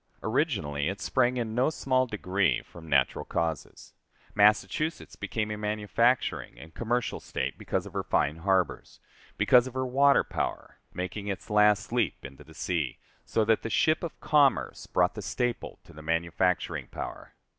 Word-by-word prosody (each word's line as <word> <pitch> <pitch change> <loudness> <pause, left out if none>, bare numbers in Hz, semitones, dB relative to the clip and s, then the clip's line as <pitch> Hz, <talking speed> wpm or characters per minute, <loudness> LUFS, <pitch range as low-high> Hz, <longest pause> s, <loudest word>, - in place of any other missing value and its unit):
Originally 75 +2 0
it 100 +1 -5
sprang 125 -1 +1
in 115 -2 -2
no 125 +5 +2
small 130 -4 +1
degree 100 -4 0
from 80 -2 -13
natural 70 -2 +2
causes. 80 -4 -4 0.4
Massachusetts 105 +10 +2
became 110 -1 -3
a 105 - -3
manufacturing 105 +4 0
and 80 0 -12
commercial 120 +1 -1
State - - -3
because - - -3
of - - -10
her - - -1
fine 75 +3 0
harbors 95 +1 -1 0.4
because 125 0 +5
of 130 - -9
her 130 0 0
water 140 +1 +4
power, - - -4
making 95 +3 -5
its 100 +1 -5
last 105 0 +4
leap 120 -1 -1
into 70 0 -10
the - - -17
sea, 80 -8 -2 0.3
so 110 - +1
that 110 0 +3
the 115 - -4
ship 155 +6 +2
of 170 - -6
commerce 145 -3 +2
brought - - +2
the - - -6
staple 120 -1 -2
to - - -16
the 75 - -11
manufacturing 85 +3 0
power. - - -7
105 Hz, 160 wpm, -28 LUFS, 90-125 Hz, 0.4 s, because